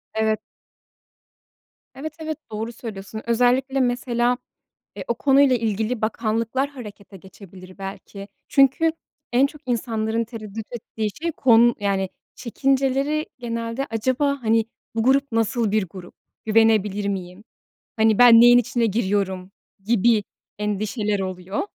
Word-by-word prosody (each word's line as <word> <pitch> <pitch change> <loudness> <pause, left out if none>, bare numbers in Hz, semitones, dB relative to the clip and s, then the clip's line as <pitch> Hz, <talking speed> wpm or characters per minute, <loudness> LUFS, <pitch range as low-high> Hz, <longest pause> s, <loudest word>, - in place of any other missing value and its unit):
Evet. 220 -1 +1 1.6
Evet, 305 +3 -6
evet, 315 -1 -4
doğru 220 +2 -4
söylüyorsun. 220 -2 -8
Özellikle, 250 +3 +2
mesela, 245 -1 +1 0.6
eee, - - -6
o 235 - +1
konuyla 270 0 +4
ilgili 220 +1 -2
bakanlıklar 230 +4 -1
harekete 210 -7 -11
geçebilir 185 0 -14
belki. 195 +1 -8 0.2
Çünkü 275 +4 +3 0.4
en 255 +3 +4
çok 290 +1 -13
insanların 225 -2 -1
tereddüt 220 -2 -8
ettiği 220 -2 -4
şey, 335 - -1
kon 240 -4 +5
yani, 195 -1 0 0.3
çekinceleri 275 +4 0
genelde 230 +2 -4
acaba, 260 +5 0
hani, 225 0 +2 0.3
bu 225 - 0
grup 275 +2 +2
nasıl 225 0 0
bir 210 -2 +1
grup, 180 -1 -11 0.3
güvenebilir 215 -2 +2
miyim, 185 0 -5 0.5
hani, 220 -1 +3
ben 235 -2 +8
neyin 240 0 +8
içine 240 0 +1
giriyorum 195 -3 -1 0.3
gibi 225 -1 +3 0.4
endişeler 210 0 -1
oluyor. 185 +1 -4
225 Hz, 120 wpm, -22 LUFS, 210-250 Hz, 1.6 s, ben